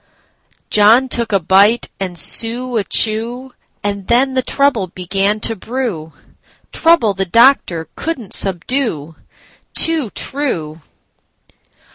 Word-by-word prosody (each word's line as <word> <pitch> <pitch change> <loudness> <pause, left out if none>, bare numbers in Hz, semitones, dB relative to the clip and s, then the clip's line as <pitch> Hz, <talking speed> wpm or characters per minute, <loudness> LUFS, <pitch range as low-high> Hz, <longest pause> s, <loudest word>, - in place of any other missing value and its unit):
John 225 +5 +4
took 235 -2 -2
a 195 - +2
bite 200 +7 +3
and 185 -2 -4
Sue 240 +6 +1
a 210 - 0
chew, 235 +6 -1 0.3
And 200 -2 -4
then 260 +3 +2
the 260 - +1
trouble 260 -7 0
began 195 +4 -2
to 225 - 0
brew,—Trouble 230 - -2
the 195 0 -2
doctor 190 - +3
could 330 -3 -4
n't 215 -5 -10
subdue. 185 - -2 0.6
Too 320 -8 +1
true! 170 - -4
220 Hz, 110 wpm, -16 LUFS, 190-255 Hz, 0.6 s, John